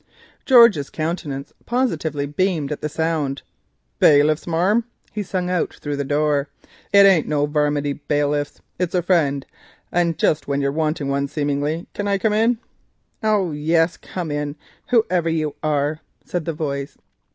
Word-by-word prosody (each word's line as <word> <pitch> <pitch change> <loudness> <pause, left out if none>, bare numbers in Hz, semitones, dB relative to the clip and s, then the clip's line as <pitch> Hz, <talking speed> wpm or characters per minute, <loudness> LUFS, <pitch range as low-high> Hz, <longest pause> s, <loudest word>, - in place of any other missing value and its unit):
George's 235 - +6
countenance 155 -4 -4
positively 160 - -1
beamed 155 -1 -1
at 150 - -4
the 150 - -2
sound. 155 -3 -1 0.6
"Bailiffs, 150 +2 +4
marm?" 190 +8 +2 0.3
he 210 0 -3
called 180 -2 -1
through 145 -1 -4
the 140 - -2
door—"it 150 +7 +1
ain't 185 -6 +5
no 145 -1 +1
varminty 145 -1 0
bailiffs, 145 0 0 0.2
it's 180 0 -1
a 180 - +1
friend, 145 -7 +1 0.5
and 170 -2 +1
just 155 - +1
when 140 0 0
you're 140 0 0
a - - -9
wanting 155 -2 -1
one 140 0 0
seemingly. 145 +3 -2
Can 205 - -3
I 200 0 +2
come 210 +2 +1
in?" 225 +3 +3 0.6
"Oh, 210 -5 +1
yes, 165 +3 +1
come 175 -4 -6
in, 145 0 -3 0.3
whoever 185 - +2
you 155 -2 -1
are," 150 0 0 0.3
said 175 -3 -3
the 165 - -2
voice. 140 -3 -4
155 Hz, 150 wpm, -21 LUFS, 145-180 Hz, 0.6 s, George's